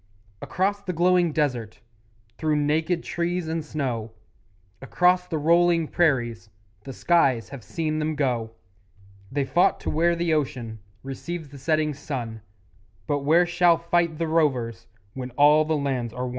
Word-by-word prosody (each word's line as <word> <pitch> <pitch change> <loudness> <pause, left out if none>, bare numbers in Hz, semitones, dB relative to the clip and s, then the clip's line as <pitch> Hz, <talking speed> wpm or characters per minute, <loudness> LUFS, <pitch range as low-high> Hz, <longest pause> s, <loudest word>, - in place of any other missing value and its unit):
Across 200 +3 -1
the 180 - -2
glowing 175 0 +3
desert; 125 -8 -2 0.6
Through 155 -1 +1
naked 155 +4 0
trees 175 0 -2
and 160 0 -2
snow; 125 -8 -4 0.7
Across 180 +6 +2
the 165 - -2
rolling 170 +1 +3
prairies 120 - 0 0.4
The 135 - -6
skies 135 -6 +2
have 135 -5 -9
seen 155 - -2
them 155 0 -1
go; 125 -6 -1 0.8
They 140 0 -1
fought 175 +7 +2
to - - -3
where 170 +2 +2
the 170 -1 0
ocean 125 -7 -2 0.2
Receives 150 +4 -6
the 140 0 -12
setting 155 +1 0
sun; 125 -6 -6 0.6
But 145 +6 0
where 160 +5 +4
shall 175 -1 +3
fight 170 -1 0
the 165 0 -1
rovers 135 -8 0 0.3
When 130 -1 -6
all 150 +2 +6
the 155 0 0
lands 130 -5 -2
are 125 +1 -4
won? - - -3
155 Hz, 150 wpm, -24 LUFS, 130-170 Hz, 0.8 s, all